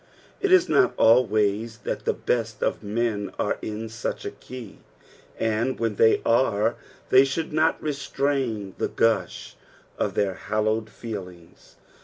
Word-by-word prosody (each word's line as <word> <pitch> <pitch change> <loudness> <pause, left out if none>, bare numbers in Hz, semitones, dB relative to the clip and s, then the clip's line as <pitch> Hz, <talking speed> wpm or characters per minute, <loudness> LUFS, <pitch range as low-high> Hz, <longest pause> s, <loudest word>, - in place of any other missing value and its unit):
It 395 - 0
is 370 -1 +6
not 385 - +3
always 110 -1 +3
that - - -4
the - - +2
best 115 -3 -2
of - - 0
men 105 -1 -2
are - - -1
in 110 +1 -5
such 115 +1 -5
a - - -3
key, 125 -5 -10 0.6
and 115 +4 0
when 115 -3 -1
they 110 - +4
are 115 -2 +2 0.3
they 130 +1 +7
should 150 +4 -3
not 155 +1 +2
restrain 135 -8 -2
the - - +1
gush 110 -6 0 0.4
of - - -1
their 100 -2 +1
hallowed 110 +3 -1
feelings. 90 -7 -9
115 Hz, 140 wpm, -25 LUFS, 105-130 Hz, 0.6 s, they